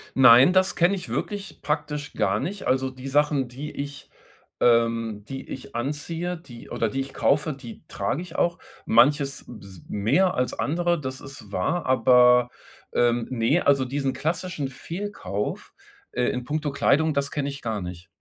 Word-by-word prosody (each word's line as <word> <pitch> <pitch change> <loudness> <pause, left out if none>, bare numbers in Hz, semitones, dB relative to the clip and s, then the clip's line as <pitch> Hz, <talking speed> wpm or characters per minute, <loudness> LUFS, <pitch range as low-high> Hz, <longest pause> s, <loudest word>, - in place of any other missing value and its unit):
Nein, 130 +4 +8
das 185 0 +3
kenne 175 +4 +3
ich 185 - -7
wirklich 205 -1 -4
praktisch 150 -1 -3
gar 95 +2 +1
nicht. 195 - -4
Also, 130 0 +1
die 130 +1 -9
Sachen, 145 -2 +2
die 135 +5 -7
ich, 140 0 -7 0.5
ähm 115 -3 +2
die 135 0 -7
ich 130 - -8
anziehe, 160 +7 -3
die 120 -8 -13
oder 115 - -1
die 135 +5 -2
ich 135 - -7
kaufe, 150 +2 +1
die 125 -4 -11
trage 115 - -2
ich 180 -2 -10
auch. 175 +1 +1 0.3
Manches 140 +4 +3
b 115 -4 -10
s 95 -4 -13
mehr 145 - +2
als 125 0 -1
andere, 175 +2 0
das 130 -2 -5
ist 130 -7 -11
wahr, 145 - -1
aber, 125 -1 +5 0.4
ähm, 120 -1 +2
ne, 130 +7 +2
also, 135 -2 +4
diesen 135 +1 -1
klassischen 170 -2 -2
Fehlkauf, 135 - -5 0.4
äh, 125 - -1
in 125 0 -1
puncto 150 +2 -2
Kleidung, 155 +3 +2
das 140 0 0
kenne 140 -1 -2
ich 140 - -7
gar 110 -3 -3
nicht. 90 +1 -8
135 Hz, 170 wpm, -25 LUFS, 120-150 Hz, 0.5 s, Nein